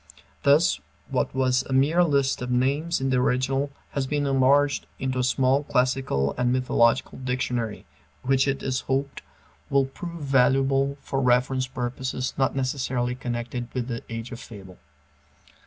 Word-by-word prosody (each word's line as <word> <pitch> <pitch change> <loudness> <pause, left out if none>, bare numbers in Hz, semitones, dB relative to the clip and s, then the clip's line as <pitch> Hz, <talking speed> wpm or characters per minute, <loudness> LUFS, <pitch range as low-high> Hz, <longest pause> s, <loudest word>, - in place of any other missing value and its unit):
Thus 140 - +4 0.3
what - - 0
was 130 -1 +2
a - - -1
mere 150 +7 +4
list 140 -5 +1
of 125 - -4
names 140 +7 +1
in 135 0 0
the 130 - +3
original 130 +2 +1 0.2
has 135 -2 -2
been 145 +1 0
enlarged 140 +1 +3
into 130 -1 -2
a - - +1
small 130 +2 +2
classical 125 - 0
and 125 0 +2
mythological 125 -2 +2
dictionary, 125 -4 -2 0.4
which 135 +1 +2
it 135 0 -1
is 130 -1 -1
hoped 135 +1 -1 0.5
will 140 -1 +3
prove 170 +4 -8
valuable 135 +1 +2
for 135 - -2
reference 130 +1 +2
purposes 130 +1 -3
not 135 0 +1
necessarily 130 -2 -1
connected 120 0 -4
with 125 0 -2
"The 115 -1 -3
Age 115 +1 -6
of 120 - -7
Fable." 95 -7 -12
130 Hz, 150 wpm, -25 LUFS, 125-135 Hz, 0.5 s, Thus